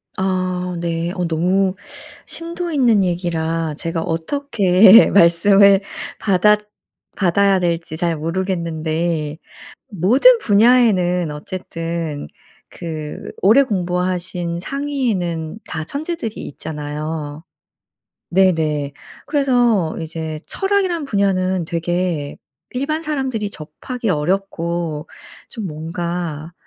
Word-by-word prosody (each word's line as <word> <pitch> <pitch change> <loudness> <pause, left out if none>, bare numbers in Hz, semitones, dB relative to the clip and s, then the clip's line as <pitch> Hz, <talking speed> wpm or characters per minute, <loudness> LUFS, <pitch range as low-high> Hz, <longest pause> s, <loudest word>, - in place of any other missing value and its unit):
아 185 -1 -1
네. 170 0 -2
어 180 - -1
너무 185 +4 +1 0.5
심도 340 +1 -5
있는 240 -8 +3
얘기라 165 -3 -1
제가 165 0 -2
어떻게 190 - +5
말씀을 195 +3 +5 0.4
받았 210 +1 +4 0.6
받아야 195 +1 +3
될지 170 -2 -2
잘 170 -1 0
모르겠는데 165 -2 -2 0.5
모든 245 - +5
분야에는 200 - +3
어쨌든 165 -2 -5 0.4
그 155 -3 -7
오래 225 +9 +6
공부하신 180 -4 -2
상위에는 215 - -2
다 160 - -4
천재들이 285 - -4
있잖아요. 150 +1 -5 0.9
네네. 160 -6 +2 0.3
그래서 245 - +2
이제 160 -1 -5
철학이란 385 -5 0
분야는 190 -5 0
되게 170 -2 -2 0.3
일반 295 +5 -2
사람들이 265 -9 -2
접하기 210 - -6
어렵고 170 -2 -1 0.4
좀 215 -4 -5
뭔가 165 0 -4
180 Hz, 210 characters per minute, -19 LUFS, 165-210 Hz, 0.9 s, 오래